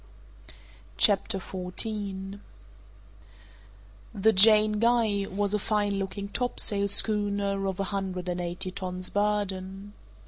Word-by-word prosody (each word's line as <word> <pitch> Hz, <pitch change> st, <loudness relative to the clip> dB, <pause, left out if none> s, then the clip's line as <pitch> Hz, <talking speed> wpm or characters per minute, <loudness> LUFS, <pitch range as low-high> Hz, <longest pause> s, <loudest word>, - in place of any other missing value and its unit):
CHAPTER 195 Hz, -2 st, +3 dB
14 195 Hz, +1 st, -4 dB, 1.7 s
The 220 Hz, +3 st, +3 dB
Jane 215 Hz, +2 st, +6 dB
Guy 225 Hz, -4 st, +1 dB
was 200 Hz, +1 st, -2 dB
a 210 Hz, -, +1 dB
fine 205 Hz, -1 st, -1 dB
looking 200 Hz, +1 st, -5 dB
topsail 205 Hz, -3 st, 0 dB
schooner 200 Hz, -1 st, +1 dB
of 190 Hz, -1 st, -4 dB
a -, -, 0 dB
hundred 185 Hz, -2 st, -4 dB
and 180 Hz, 0 st, -2 dB
eighty 175 Hz, +2 st, -3 dB
tons 185 Hz, -1 st, -5 dB
burden. 200 Hz, -1 st, -2 dB
200 Hz, 105 wpm, -27 LUFS, 190-210 Hz, 1.7 s, Jane